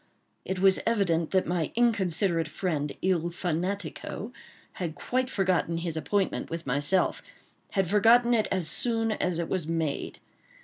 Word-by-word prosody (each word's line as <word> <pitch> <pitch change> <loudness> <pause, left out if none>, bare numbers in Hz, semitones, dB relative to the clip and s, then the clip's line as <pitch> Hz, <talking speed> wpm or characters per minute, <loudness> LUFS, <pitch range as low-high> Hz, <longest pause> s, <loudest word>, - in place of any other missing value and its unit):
It 190 - -3
was 190 0 +5
evident 180 -8 +1
that 190 -1 +2
my 175 -3 -1
considerate 190 -7 +1
friend, 150 -3 -2
il 175 -2 +1
fanatico, 180 +5 -4 0.5
had 165 -3 -3
quite 255 +1 -1
forgotten 185 -6 0
his 165 -1 -3
appointment 195 +5 -1
with 165 0 -5
myself—had 175 - -1
forgotten 230 +5 +5
it 220 -2 +2
as 185 -4 +1
soon 225 +6 +1
as 180 -5 -1
it 170 -1 -2
was 175 -5 -1
made. 160 -3 -2
180 Hz, 135 wpm, -27 LUFS, 165-205 Hz, 0.5 s, was